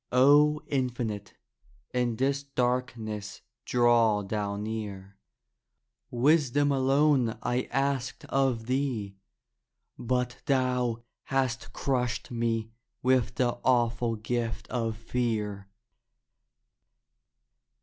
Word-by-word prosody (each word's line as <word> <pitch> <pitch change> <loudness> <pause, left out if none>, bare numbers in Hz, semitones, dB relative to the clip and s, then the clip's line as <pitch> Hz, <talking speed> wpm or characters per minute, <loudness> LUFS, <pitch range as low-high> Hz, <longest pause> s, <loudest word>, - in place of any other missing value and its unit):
O 145 +4 +5
Infinite, 120 -6 -2 0.6
in 125 -2 +1
this 135 +3 0
darkness 120 -6 -2 0.2
draw 120 -4 +3
thou 100 0 -2
near. 100 -2 -5 0.9
Wisdom 145 +2 +3
alone 135 -3 +3
I 125 +1 -1
asked 135 -1 -1
of 130 -4 0
thee, 125 -6 -2 0.8
but 125 +1 -1
thou 125 -3 +1 0.2
Hast 130 -2 -1
crushed 125 -3 -1
me 115 -1 -1 0.3
with 125 -2 +2
the 120 -2 0
awful 120 -2 +2
gift 115 +1 -3
of 115 -3 -2
fear. 110 -4 -2
120 Hz, 85 wpm, -28 LUFS, 110-130 Hz, 0.9 s, O